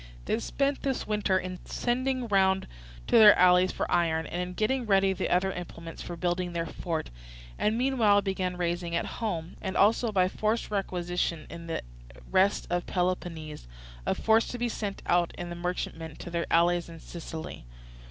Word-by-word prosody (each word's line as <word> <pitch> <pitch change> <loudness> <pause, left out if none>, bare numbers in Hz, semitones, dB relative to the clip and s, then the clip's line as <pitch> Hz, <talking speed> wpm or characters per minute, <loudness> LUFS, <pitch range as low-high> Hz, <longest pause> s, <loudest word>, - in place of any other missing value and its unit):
They 220 - 0
spent 275 +4 -1
this 270 -2 -1
winter 210 -3 +1
in 185 0 -4
sending 255 +1 -1
round 190 -2 +3 0.4
to - - +5
their 210 -2 +9
allies 180 +1 +5
for - - -2
iron, 165 -2 +2
and 175 +3 -3
in 180 0 -4
getting 235 +4 0
ready 195 -1 +4
the - - -2
other 185 +2 +2
implements 165 -2 -8
for 175 - -6
building 175 +1 -1
their 165 -1 -1
fort; 165 - -4 0.5
and 215 +2 +1
meanwhile 235 -6 +3
began 185 -2 -2
raising 175 -1 -1
at 170 - 0
home, 175 -8 -4
and 190 - -3
also 220 +3 +4
by 185 -3 +3
forced 215 +4 -1
requisitions 175 -4 -2
in 170 0 -8
the 165 - -3 0.5
rest 195 +2 +3
of 175 0 -1
Peloponnese, 175 - -2 0.4
a - - 0
force 225 +1 +3
to 245 - -5
be 240 0 -1
sent 205 -3 -4
out 175 -1 +2
in 175 0 -5
the - - -4
merchantmen 170 -3 -4
to 175 - -8
their 170 0 -1
allies 170 +1 +3
in 165 -1 -10
Sicily. 160 - -8
180 Hz, 175 wpm, -28 LUFS, 170-210 Hz, 0.5 s, their